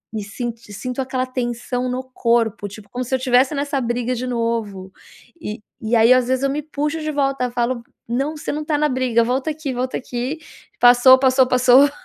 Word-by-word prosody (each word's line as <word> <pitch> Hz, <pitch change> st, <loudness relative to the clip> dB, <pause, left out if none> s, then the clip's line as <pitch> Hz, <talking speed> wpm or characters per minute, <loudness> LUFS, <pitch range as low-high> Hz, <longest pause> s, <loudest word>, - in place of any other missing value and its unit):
e 210 Hz, -, -3 dB
sinto 230 Hz, +3 st, -5 dB
sinto 250 Hz, +5 st, -4 dB
aquela 260 Hz, 0 st, -2 dB
tensão 250 Hz, 0 st, -3 dB
no 255 Hz, +1 st, -3 dB
corpo, 230 Hz, -4 st, 0 dB
tipo 200 Hz, 0 st, -12 dB
como 250 Hz, +3 st, -4 dB
se 260 Hz, -, -1 dB
eu -, -, -2 dB
tivesse 255 Hz, +2 st, +3 dB
nessa 280 Hz, -1 st, -1 dB
briga 240 Hz, +1 st, -1 dB
de 250 Hz, +1 st, -4 dB
novo 225 Hz, -6 st, -3 dB, 0.5 s
e 210 Hz, -6 st, -5 dB, 0.2 s
e 225 Hz, +2 st, 0 dB
aí 230 Hz, +3 st, +6 dB
às 255 Hz, -1 st, +2 dB
vezes 260 Hz, +1 st, 0 dB
eu 275 Hz, -, +2 dB
me 300 Hz, +2 st, -2 dB
puxo 300 Hz, +1 st, -3 dB
de 310 Hz, -, -3 dB
volta, 275 Hz, -3 st, 0 dB
falo: 240 Hz, 0 st, -1 dB, 0.3 s
"Não, 275 Hz, +6 st, -1 dB
você -, -, -4 dB
não 300 Hz, +1 st, -3 dB
tá 300 Hz, -2 st, 0 dB
na 300 Hz, 0 st, +2 dB
briga, 250 Hz, -3 st, +1 dB
volta 260 Hz, +5 st, -1 dB
aqui, 300 Hz, -3 st, -4 dB
volta 255 Hz, +1 st, -2 dB
aqui, 255 Hz, +4 st, -4 dB, 0.4 s
passou, 245 Hz, +2 st, +7 dB
passou, 260 Hz, -1 st, +4 dB
passou." 255 Hz, +3 st, +5 dB
255 Hz, 200 wpm, -20 LUFS, 240-270 Hz, 0.5 s, passou